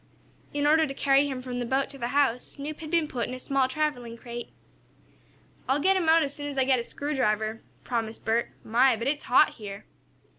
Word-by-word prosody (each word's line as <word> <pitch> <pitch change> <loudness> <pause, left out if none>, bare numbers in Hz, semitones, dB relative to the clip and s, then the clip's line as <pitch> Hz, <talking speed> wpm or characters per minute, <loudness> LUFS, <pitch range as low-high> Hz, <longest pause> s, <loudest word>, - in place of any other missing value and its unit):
In 290 0 -1
order 315 +1 +4
to 275 - -6
carry 275 +1 +3
him 260 -2 -5
from 250 -1 -4
the - - -1
boat 265 +2 +1
to 275 - -11
the 240 - -1
house 260 -2 +2
Snoop 295 +2 -6
had 315 -2 -7
been 330 -2 +2
put 245 -4 -3
in 255 - -5
a - - -8
small 270 0 +1
traveling 260 -5 -2
crate. 240 0 -7 1.2
"I'll 270 +2 +3
let 380 +6 +3
him 350 -4 +1
out 325 0 +6
as 280 -1 -3
soon 290 -1 -6
as 285 -1 -6
I 265 - +4
get 260 -1 +3
a - - -3
screwdriver," 225 -7 -1 0.2
promised 230 -2 -3
Bert. 230 +1 +1
"My, 245 +3 +4
but 230 +3 -4
it's 290 +1 -1
hot 245 - +5
here!" 200 -2 -8
265 Hz, 220 wpm, -27 LUFS, 235-290 Hz, 1.2 s, out